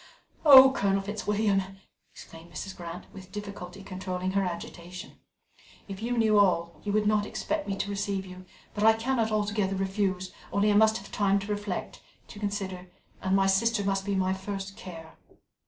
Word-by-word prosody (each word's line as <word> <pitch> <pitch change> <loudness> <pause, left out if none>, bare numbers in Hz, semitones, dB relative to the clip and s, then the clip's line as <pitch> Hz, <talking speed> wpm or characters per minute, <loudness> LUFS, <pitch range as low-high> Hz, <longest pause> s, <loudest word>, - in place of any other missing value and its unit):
"Oh, 265 -3 +10
Colonel 195 -5 +1
Fitzwilliam!" 205 0 0 0.5
exclaimed 165 +1 -13
Mrs. 195 -2 -6
Grant, 170 0 -8
with 190 -1 -12
difficulty 200 -2 -7
controlling 185 -1 -4
her 195 +1 +1
agitation, 180 +1 -6 0.7
"if 195 0 -7
you 240 +2 -1
knew 215 -2 +4
all, 170 -4 +1
you 205 - -2
would 210 +1 +2
not 210 0 +2
expect 310 -1 -3
me 195 - -1
to 195 - -3
receive 200 -1 -2
you; 185 0 -11 0.3
but 210 - -2
I 220 0 +7
cannot 225 0 0
altogether 205 -2 0
refuse, 190 -1 -1 0.2
only 205 +1 +3
I - - +2
must 220 +1 +5
have 195 - -11
time 200 -1 +2
to 200 +1 -4
reflect, 205 -2 -4 0.3
to 205 - -10
consider 195 -3 -4 0.3
and 190 0 +1
my 195 0 +4
sister 205 +3 +2
must 195 0 0
be 200 0 -1
my 190 0 +1
first 195 0 -5
care." 165 -3 -10
195 Hz, 170 wpm, -28 LUFS, 190-210 Hz, 0.7 s, Oh